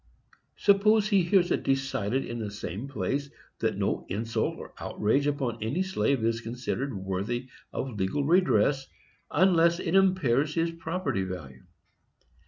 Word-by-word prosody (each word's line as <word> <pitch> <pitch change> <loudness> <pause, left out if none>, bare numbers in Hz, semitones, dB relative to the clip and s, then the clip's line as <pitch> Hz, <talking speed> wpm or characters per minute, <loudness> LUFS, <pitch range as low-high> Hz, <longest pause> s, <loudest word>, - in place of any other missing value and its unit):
Suppose 210 +1 +4
he 200 -3 +4
hears 180 0 +3
it - - +1
decided 135 -3 0
in 120 0 -5
the 110 -2 -3
same 105 +3 -6
place 140 0 -2 0.3
that - - 0
no - - -1
insult 110 +4 -1
or - - -10
outrage 135 +8 0
upon 130 -6 -2
any 135 - 0
slave 140 -10 0
is 115 0 0
considered 125 +4 -3
worthy 100 +7 -3 0.2
of 125 -6 -4
legal 95 +10 0
redress, 140 - +3 0.4
unless 170 0 +4
it 165 - -2
impairs 155 -7 +3
his 165 0 +1
property 165 - -2
value. 85 -9 -7
135 Hz, 140 wpm, -28 LUFS, 110-170 Hz, 0.4 s, Suppose